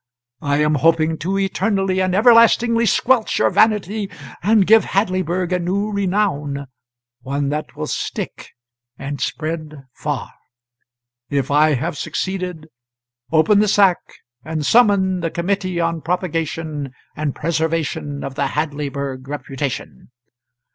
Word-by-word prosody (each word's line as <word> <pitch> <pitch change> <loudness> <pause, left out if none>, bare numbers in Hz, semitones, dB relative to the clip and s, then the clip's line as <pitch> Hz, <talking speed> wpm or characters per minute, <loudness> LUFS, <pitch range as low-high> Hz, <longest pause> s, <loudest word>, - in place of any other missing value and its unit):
I 145 0 0
am 150 0 +2
hoping 160 0 +3
to 190 +4 -1
eternally 195 -1 0
and 185 -1 +1
everlastingly 230 +1 +5
squelch 240 +1 +2
your - - +3
vanity 210 -1 +2 0.3
and 210 +1 +4
give 220 +2 +6
Hadleyburg 185 -2 -1
a 180 - +1
new 200 +4 -1
renown 180 -8 -1 0.6
one 140 +2 -2
that 150 +1 -4
will - - -4
stick - - -4 0.5
and 140 0 -5
spread 155 -2 -4
far. - - -4 1.0
If 140 -2 -1
I 150 +1 +4
have 135 +3 -3
succeeded, 180 -4 -4 0.6
open 165 +6 +4
the 210 - +3
sack 195 -3 +4 0.4
and 155 -1 -3
summon 200 -5 +4
the 165 -1 -1
Committee 185 +1 -2
on 165 -1 -1
Propagation 160 -5 -3 0.2
and 150 -2 -2
Preservation 160 -3 -2
of 135 - -5
the 140 0 -1
Hadleyburg 140 -3 -3
Reputation.'" 135 -1 -5
165 Hz, 120 wpm, -20 LUFS, 150-195 Hz, 1.0 s, give